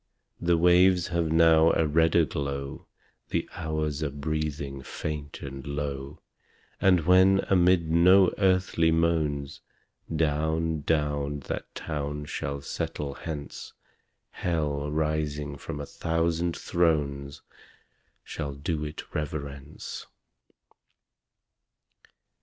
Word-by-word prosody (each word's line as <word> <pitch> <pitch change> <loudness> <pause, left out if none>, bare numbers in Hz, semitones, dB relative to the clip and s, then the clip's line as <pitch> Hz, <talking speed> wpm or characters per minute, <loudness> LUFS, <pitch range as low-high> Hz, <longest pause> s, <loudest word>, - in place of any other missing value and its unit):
The 85 0 +2
waves 90 +1 +5
have 85 -2 0
now 80 0 +5
a 80 - +2
redder 80 +2 +3
glow 70 -1 -4 0.4
The - - -1
hours 80 -1 -2
are 75 - 0
breathing 70 -1 -3
faint 75 +1 -6
and 70 -1 -7
low 70 0 -5 0.6
And 90 -3 +4
when, 95 +3 +5
amid 90 -3 +4
no 90 +3 +6
earthly 95 -4 +3
moans, 80 -4 0 0.5
Down, 80 +1 0
down 75 -1 0
that - - -6
town 75 -1 -4
shall 70 -1 -4
settle 70 0 -4
hence, 75 0 -7 0.6
Hell, 75 -4 -1
rising 75 -1 -1
from 70 +1 -7
a 70 - -4
thousand 85 +2 -1
thrones, 70 -5 0 0.8
Shall 70 -1 -5
do 75 +2 -2
it 75 0 -7
reverence. 70 -1 -5
75 Hz, 100 wpm, -27 LUFS, 70-85 Hz, 0.8 s, no